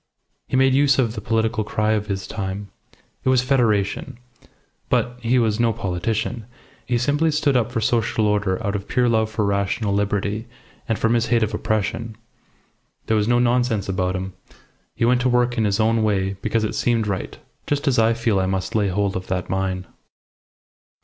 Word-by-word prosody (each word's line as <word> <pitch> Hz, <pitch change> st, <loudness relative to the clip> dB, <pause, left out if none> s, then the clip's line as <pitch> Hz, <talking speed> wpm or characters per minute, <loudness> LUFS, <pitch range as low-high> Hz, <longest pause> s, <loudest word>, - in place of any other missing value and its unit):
He -, -, -2 dB
made 130 Hz, 0 st, +4 dB
use 140 Hz, 0 st, +4 dB
of 120 Hz, -4 st, +1 dB
the 110 Hz, -, -6 dB
political 110 Hz, 0 st, 0 dB
cry 105 Hz, +1 st, 0 dB
of 105 Hz, -1 st, 0 dB
his 95 Hz, -2 st, -3 dB
time. 100 Hz, 0 st, -5 dB, 0.5 s
It -, -, +1 dB
was 130 Hz, -1 st, +4 dB
Federation. 115 Hz, -7 st, +1 dB, 0.7 s
But 125 Hz, 0 st, 0 dB
he 120 Hz, +2 st, +2 dB
was 110 Hz, -2 st, +1 dB
no 115 Hz, -1 st, +3 dB
politician. 105 Hz, +4 st, -2 dB, 0.4 s
He 120 Hz, -, +1 dB
simply 145 Hz, +6 st, +1 dB
stood 150 Hz, -2 st, +1 dB
up 120 Hz, -3 st, +1 dB
for 115 Hz, -, -1 dB
social 110 Hz, -1 st, +1 dB
order 100 Hz, -2 st, +1 dB
out 100 Hz, 0 st, -1 dB
of 100 Hz, 0 st, -4 dB
pure 125 Hz, -1 st, +2 dB
love 110 Hz, -2 st, +2 dB
for 110 Hz, -1 st, -1 dB
rational 100 Hz, +1 st, 0 dB
liberty 105 Hz, +2 st, -1 dB, 0.4 s
and 115 Hz, -, +1 dB
from 115 Hz, +1 st, +1 dB
his 120 Hz, -1 st, +1 dB
hate 115 Hz, -1 st, +2 dB
of 110 Hz, -, -2 dB
oppression. 110 Hz, 0 st, -2 dB, 0.9 s
There 110 Hz, -, +1 dB
was 105 Hz, -1 st, +1 dB
no 120 Hz, 0 st, +3 dB
nonsense 120 Hz, -4 st, +1 dB
about 95 Hz, -1 st, -1 dB
him. 95 Hz, 0 st, -4 dB, 0.6 s
He -, -, +1 dB
went 125 Hz, +1 st, +3 dB
to 125 Hz, -, +2 dB
work 125 Hz, 0 st, +2 dB
in 110 Hz, -3 st, +1 dB
his 100 Hz, 0 st, 0 dB
own 110 Hz, +1 st, +2 dB
way 100 Hz, -3 st, +1 dB
because 110 Hz, 0 st, 0 dB
it 110 Hz, -, -1 dB
seemed 115 Hz, -2 st, +1 dB
right, 100 Hz, -2 st, -4 dB, 0.3 s
just 145 Hz, +1 st, -1 dB
as 130 Hz, -4 st, +3 dB
I 115 Hz, +1 st, +4 dB
feel 115 Hz, -4 st, +1 dB
I 95 Hz, -, 0 dB
must 95 Hz, +3 st, -2 dB
lay 105 Hz, -3 st, +2 dB
hold 100 Hz, +1 st, 0 dB
of 95 Hz, 0 st, -4 dB
that 90 Hz, -1 st, -3 dB
mine." 95 Hz, -1 st, -1 dB
110 Hz, 190 wpm, -22 LUFS, 100-120 Hz, 0.9 s, made